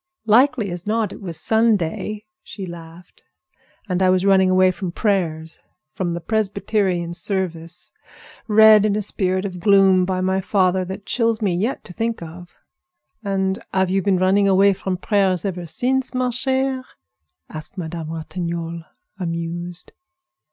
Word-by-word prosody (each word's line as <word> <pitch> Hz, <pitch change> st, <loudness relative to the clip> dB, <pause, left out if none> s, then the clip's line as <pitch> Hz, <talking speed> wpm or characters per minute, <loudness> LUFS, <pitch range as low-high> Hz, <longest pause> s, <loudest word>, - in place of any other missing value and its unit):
"Likely 225 Hz, -2 st, +3 dB
as 175 Hz, +2 st, -6 dB
not 215 Hz, -2 st, 0 dB
it -, -, -11 dB
was 170 Hz, -5 st, -5 dB
Sunday," 215 Hz, -2 st, 0 dB, 0.2 s
she 195 Hz, -, -8 dB
laughed; 170 Hz, 0 st, -12 dB, 0.7 s
"and 180 Hz, -1 st, -1 dB
I 185 Hz, -, +4 dB
was 185 Hz, +1 st, +2 dB
running 190 Hz, -1 st, +4 dB
away 185 Hz, 0 st, +4 dB
from 185 Hz, -1 st, -5 dB
prayers, 165 Hz, -6 st, -1 dB, 0.3 s
from 175 Hz, -2 st, -2 dB
the -, -, -3 dB
Presbyterian 195 Hz, -2 st, -1 dB
service, 170 Hz, -2 st, -3 dB, 0.6 s
read 215 Hz, -1 st, +7 dB
in 210 Hz, -1 st, +1 dB
a 210 Hz, -, 0 dB
spirit 185 Hz, -1 st, 0 dB
of 180 Hz, -2 st, -5 dB
gloom 195 Hz, -1 st, +5 dB
by 185 Hz, 0 st, -1 dB
my 190 Hz, +1 st, 0 dB
father 185 Hz, -1 st, +1 dB
that 190 Hz, +2 st, -7 dB
chills 230 Hz, -3 st, 0 dB
me 200 Hz, -5 st, 0 dB
yet 220 Hz, +9 st, -2 dB
to 180 Hz, -, -10 dB
think 230 Hz, +4 st, -2 dB
of." 175 Hz, +2 st, -11 dB, 0.7 s
"And 190 Hz, -1 st, -1 dB
have 190 Hz, -1 st, +1 dB
you 195 Hz, +1 st, +2 dB
been 195 Hz, -1 st, +2 dB
running 190 Hz, +2 st, +3 dB
away 195 Hz, +1 st, +5 dB
from 190 Hz, -1 st, -3 dB
prayers 195 Hz, -1 st, +1 dB
ever 180 Hz, -3 st, -4 dB
since, 255 Hz, -, -1 dB
ma 255 Hz, 0 st, +1 dB
chère?" 260 Hz, +1 st, 0 dB, 0.6 s
asked 155 Hz, +4 st, -9 dB
Madame 165 Hz, -2 st, -5 dB
Ratignolle, 170 Hz, 0 st, -5 dB, 0.4 s
amused. 170 Hz, 0 st, -5 dB
190 Hz, 150 wpm, -21 LUFS, 175-210 Hz, 0.7 s, read